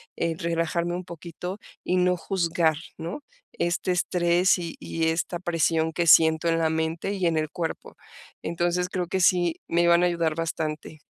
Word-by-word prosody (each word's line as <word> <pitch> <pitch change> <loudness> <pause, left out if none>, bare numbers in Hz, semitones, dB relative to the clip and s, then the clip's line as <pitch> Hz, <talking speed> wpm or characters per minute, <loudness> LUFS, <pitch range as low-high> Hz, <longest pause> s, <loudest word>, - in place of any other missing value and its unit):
eh, 165 -1 -1
relajarme 170 0 -1
un 180 - -4
poquito 175 +3 -7 0.3
y 185 - 0
no 180 0 +3
juzgar, 170 -3 0 0.2
¿no?, 170 - -5 0.4
este 175 +2 0
estrés 180 +1 +2
y 170 -2 -5
y 160 0 -1
esta 165 +2 -1
presión 165 -2 0
que 170 +1 0
siento 160 +1 +6
en 165 - +2
la 160 -1 +2
mente 160 +4 -2
y 190 -3 0
en 165 -1 +1
el 155 -1 -1
cuerpo, 165 -2 -5 0.5
entonces, 175 +2 -1
creo 180 -1 -2
que 190 +1 -1
sí, 175 -2 +3
me 170 +1 +2
van 170 0 +5
a 180 - +4
ayudar 170 -2 0
bastante. 160 -1 -4
170 Hz, 175 wpm, -25 LUFS, 165-180 Hz, 0.5 s, siento